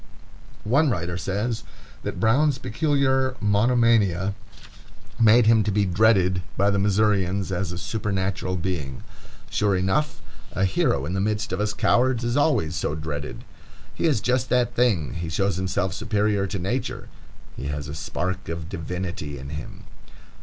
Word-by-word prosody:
One 140 +8 +3
writer 90 -6 -2
says 105 +6 -2 0.4
that - - -5
Brown's 135 +7 +3
peculiar 135 0 +1
monomania 105 -3 +3 0.9
made 115 +1 +6
him 110 0 +5
to 105 - +1
be 100 0 +2
"dreaded 95 -1 +3 0.2
by 100 +1 +3
the 100 - +1
Missourians 100 -2 +1
as 90 -1 -2
a 85 - -5
supernatural 95 -2 -2
being." 80 -8 -4 0.5
Sure 100 -2 +2
enough, 95 +12 0 0.3
a 95 - +1
hero 70 -7 +1
in 85 - -3
the 95 - 0
midst 105 0 -1
of 95 - -1
us 105 0 0
cowards 125 +3 +2
is 120 +1 0
always 140 - +2
so 75 - -1
dreaded. 75 -2 -5 0.5
He - - -2
is 135 -10 +2
just 125 +2 0
that 125 -2 +2
thing. 100 - +1
He 85 -1 -4
shows 95 +3 0
himself 95 -1 -1
superior 105 -2 0
to 100 - -3
nature. 115 +8 -3 0.5
He 70 - -5
has 70 0 -4
a 75 - -6
spark 90 +4 -3
of 85 0 -5
divinity 85 -4 -5
in 70 +1 -8
him. 75 0 -7
100 Hz, 155 wpm, -24 LUFS, 90-115 Hz, 0.9 s, made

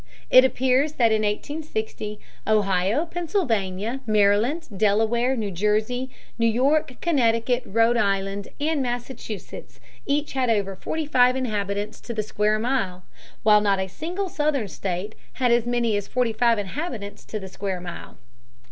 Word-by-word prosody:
It 255 - +9
appears 260 +3 +2
that 235 -6 +3
in 215 0 +2
1860 220 -2 -3 0.3
Ohio, 205 - +2
Pennsylvania, 245 - -1
Maryland, 215 +9 +2
Delaware, 225 +5 +2
New 215 -5 -2
Jersey, 215 +7 0 0.3
New 230 - +4
York, 260 +4 +2
Connecticut, 245 -6 +2
Rhode 230 +3 +3
Island, 195 -2 0
and 300 0 0
Massachusetts 245 -4 -6 0.3
each 290 +1 0
had 260 -2 +1
over 200 -3 +1
forty 315 +11 -3
five 250 -3 +4
inhabitants 210 -4 -2
to 235 - -6
the 215 - 0
square 210 0 +1
mile, 215 -7 -1 0.4
while 210 -1 +6
not 200 -2 +2
a 190 - -1
single 345 - -4
Southern 295 - 0
state 190 +3 -4 0.2
had 250 -2 +1
as 235 0 +3
many 240 -3 +1
as 205 -1 -2
forty 245 -3 0
five 230 +1 +3
inhabitants 205 - -5
to 215 - -5
the 190 - -8
square 190 -1 -4
mile. 175 -1 -9
225 Hz, 145 wpm, -24 LUFS, 205-260 Hz, 0.4 s, It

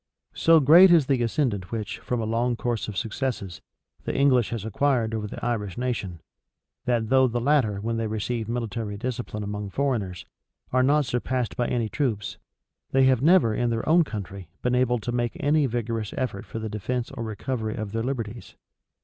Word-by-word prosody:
So 165 0 +5
great 165 +7 +8
is 165 -5 +6
the 130 -2 +1
ascendant 115 -6 -1
which, 110 -3 -4
from 125 -2 -2
a - - -2
long 120 +2 0
course 120 -1 -2
of 105 -3 -6
successes, 110 -5 -3 0.4
the - - -3
English 130 -5 +3
has 115 -3 -4
acquired 115 0 +1
over 110 -1 -2
the 105 - -7
Irish 105 -6 -2
nation, 105 -9 -3 0.6
that 120 -3 0
though 130 0 +5
the 120 0 -1
latter, 120 -6 +2
when 115 +2 -2
they 115 -1 -1
receive 110 +1 -3
military 115 -3 -3
discipline 120 -2 -4
among 105 0 -4
foreigners, 105 - -2 0.5
are 130 - +4
not 145 +3 +3
surpassed 125 0 -2
by 120 - 0
any 120 -3 0
troops, 110 -5 -2 0.5
they 135 0 +3
have 130 -2 +4
never, 160 -7 +5
in 120 +2 0
their 115 -1 -2
own 170 +2 +5
country, 100 - -7
been 125 - +1
able 125 -1 +2
to 115 +1 -4
make 120 -1 -1
any 145 0 +2
vigorous 115 -3 -3
effort 110 -6 -3
for - - -6
the 110 0 -3
defence 115 +4 -3
or 135 -3 -7
recovery 110 +1 -3
of 110 -3 -5
their 115 +1 -1
liberties. 120 -3 -5
120 Hz, 185 wpm, -25 LUFS, 110-130 Hz, 0.6 s, great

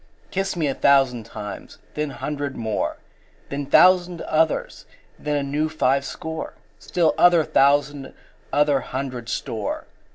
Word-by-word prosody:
Kiss 195 0 -1
me 165 -3 0
a 140 - 0
thousand 130 -6 +3
times, 105 -3 -8 0.2
then 150 0 -2
hundred 140 +1 -4
more, 110 -2 -2 0.5
Then 140 0 -4
thousand 180 +2 +5
others, 160 0 0 0.3
then 150 0 -2
a 145 - 0
new 150 +3 -1
five 140 -3 +1
score, 160 +1 -6 0.2
Still 170 -3 +1
other 175 -2 +6
thousand 145 0 +2 0.4
other 145 -1 +3
hundred 125 -3 -5
store. 110 -3 -3
145 Hz, 130 wpm, -23 LUFS, 135-160 Hz, 0.5 s, other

